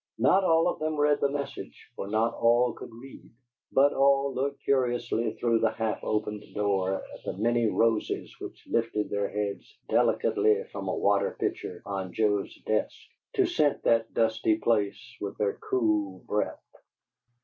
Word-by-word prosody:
Not 190 Hz, +1 st, +4 dB
all 165 Hz, -2 st, +4 dB
of -, -, -1 dB
them 155 Hz, 0 st, -1 dB
read 150 Hz, 0 st, +2 dB
the 140 Hz, -, +3 dB
message, 140 Hz, 0 st, -6 dB
for 100 Hz, -, -5 dB
not 110 Hz, +3 st, +1 dB
all 120 Hz, +1 st, +3 dB
could -, -, -10 dB
read, 125 Hz, +4 st, -13 dB, 0.4 s
but 140 Hz, +2 st, +4 dB
all 140 Hz, 0 st, +3 dB
looked 140 Hz, +2 st, -3 dB
curiously 120 Hz, -4 st, 0 dB
through 115 Hz, -1 st, +1 dB
the 110 Hz, 0 st, +3 dB
half 110 Hz, -1 st, -2 dB
opened 105 Hz, -1 st, -2 dB
door 95 Hz, -2 st, +1 dB
at -, -, -9 dB
the -, -, -5 dB
many 120 Hz, +2 st, +2 dB
roses 115 Hz, 0 st, 0 dB
which -, -, -9 dB
lifted 115 Hz, -2 st, -1 dB
their 100 Hz, 0 st, -1 dB
heads 105 Hz, -1 st, -4 dB
delicately 105 Hz, -2 st, +2 dB
from 100 Hz, -1 st, -6 dB
a 95 Hz, -, -1 dB
water 100 Hz, 0 st, +1 dB
pitcher 90 Hz, -, -3 dB
on 95 Hz, -2 st, -4 dB
Joe's 105 Hz, -2 st, 0 dB
desk 110 Hz, 0 st, 0 dB, 0.4 s
to 395 Hz, -5 st, +3 dB
scent 245 Hz, -, +1 dB
that 115 Hz, -1 st, +2 dB
dusty 110 Hz, -1 st, +1 dB
place 105 Hz, -4 st, +1 dB, 0.2 s
with 100 Hz, -1 st, -5 dB
their 100 Hz, -2 st, -1 dB
cool 105 Hz, -6 st, 0 dB
breath. 105 Hz, -, -2 dB
115 Hz, 160 wpm, -28 LUFS, 105-130 Hz, 0.4 s, Not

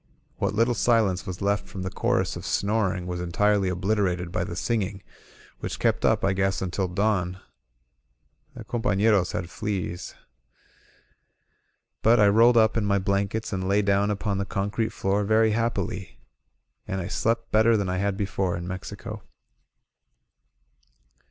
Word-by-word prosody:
What 105 Hz, -, -1 dB
little 115 Hz, +3 st, +3 dB
silence 110 Hz, -6 st, +2 dB
was 95 Hz, +1 st, -5 dB
left 100 Hz, +1 st, 0 dB
from 95 Hz, -3 st, -6 dB
the 95 Hz, -, -4 dB
chorus -, -, 0 dB
of -, -, -7 dB
snoring 100 Hz, -3 st, 0 dB
was 90 Hz, 0 st, -4 dB
entirely 100 Hz, +2 st, +1 dB
obliterated 90 Hz, -1 st, 0 dB
by 90 Hz, -, -1 dB
the 85 Hz, -, -5 dB
singing, 100 Hz, -1 st, -2 dB, 0.6 s
which -, -, -4 dB
kept -, -, +1 dB
up, -, -, +3 dB
I 95 Hz, -, +2 dB
guess, 95 Hz, 0 st, 0 dB
until 95 Hz, +1 st, -2 dB
dawn. 95 Hz, -1 st, 0 dB, 1.2 s
The -, -, -8 dB
companeroi 105 Hz, -4 st, +2 dB
had 90 Hz, -, -3 dB
fleas.. 95 Hz, -4 st, -4 dB
•. -, -, -29 dB, 1.8 s
But 115 Hz, +1 st, +5 dB
I 105 Hz, -, +6 dB
rolled 115 Hz, +3 st, +5 dB
up 110 Hz, -1 st, +4 dB
in 110 Hz, -, +1 dB
my 100 Hz, -1 st, +2 dB
blankets 100 Hz, +3 st, -1 dB
and 95 Hz, -1 st, -2 dB
lay 100 Hz, +1 st, +3 dB
down 100 Hz, +1 st, +2 dB
upon 100 Hz, -1 st, -1 dB
the -, -, 0 dB
concrete 105 Hz, +3 st, -1 dB
floor 100 Hz, +2 st, 0 dB
very 110 Hz, +2 st, +3 dB
happily. 105 Hz, -5 st, -2 dB, 0.7 s
And 95 Hz, -, -2 dB
I 90 Hz, -, -4 dB
slept 115 Hz, 0 st, -1 dB
better 110 Hz, +1 st, +4 dB
than 100 Hz, -2 st, -1 dB
I 90 Hz, 0 st, -1 dB
had 100 Hz, +1 st, -1 dB
before 95 Hz, -3 st, -1 dB
in 85 Hz, +1 st, -6 dB
Mexico. 95 Hz, 0 st, -7 dB
100 Hz, 150 wpm, -25 LUFS, 95-110 Hz, 1.8 s, I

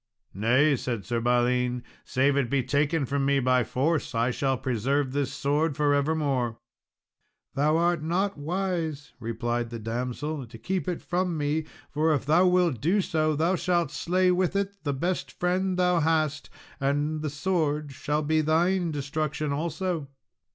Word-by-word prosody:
"Nay," 130 Hz, +9 st, +3 dB
said 115 Hz, -4 st, -3 dB
Sir 120 Hz, -1 st, -1 dB
Balin, 125 Hz, +1 st, +1 dB, 0.2 s
"save 135 Hz, +2 st, +2 dB
it 140 Hz, -4 st, +1 dB
be 135 Hz, -1 st, +1 dB
taken 145 Hz, +3 st, +1 dB
from 140 Hz, +2 st, -1 dB
me 140 Hz, 0 st, +3 dB
by 130 Hz, -1 st, +3 dB
force, 145 Hz, +2 st, -1 dB
I 115 Hz, +2 st, +2 dB
shall 135 Hz, +1 st, 0 dB
preserve 130 Hz, +3 st, 0 dB
this 140 Hz, 0 st, -1 dB
sword 145 Hz, +2 st, 0 dB
for 145 Hz, -1 st, +3 dB
evermore." 140 Hz, -5 st, 0 dB, 1.0 s
"Thou 150 Hz, +3 st, +2 dB
art 170 Hz, -1 st, +2 dB
not 185 Hz, +5 st, 0 dB
wise," 160 Hz, -2 st, -3 dB
replied 120 Hz, +1 st, -2 dB
the 115 Hz, -, -5 dB
damsel, 125 Hz, +5 st, -4 dB
"to 115 Hz, 0 st, -11 dB
keep 185 Hz, +12 st, -3 dB
it 180 Hz, -2 st, -3 dB
from 180 Hz, -1 st, -1 dB
me; 150 Hz, +1 st, 0 dB, 0.3 s
for 155 Hz, +2 st, +2 dB
if 140 Hz, -, -3 dB
thou 165 Hz, +5 st, +4 dB
wilt 180 Hz, -9 st, +2 dB
do 175 Hz, +9 st, +2 dB
so, 155 Hz, -4 st, +1 dB
thou 165 Hz, +5 st, +2 dB
shalt 175 Hz, -5 st, 0 dB
slay 180 Hz, +4 st, +2 dB
with 180 Hz, +1 st, +1 dB
it 200 Hz, 0 st, -2 dB
the 145 Hz, -2 st, -1 dB
best 175 Hz, +7 st, -2 dB
friend 185 Hz, +1 st, 0 dB
thou 180 Hz, -1 st, +3 dB
hast, 155 Hz, -2 st, 0 dB, 0.3 s
and 145 Hz, +3 st, 0 dB
the 155 Hz, -, -2 dB
sword 150 Hz, -2 st, -1 dB
shall 150 Hz, +3 st, -2 dB
be 155 Hz, +1 st, +2 dB
thine 170 Hz, +3 st, +2 dB
destruction 150 Hz, 0 st, -2 dB
also." 165 Hz, 0 st, -2 dB
150 Hz, 160 wpm, -27 LUFS, 135-170 Hz, 1.0 s, thou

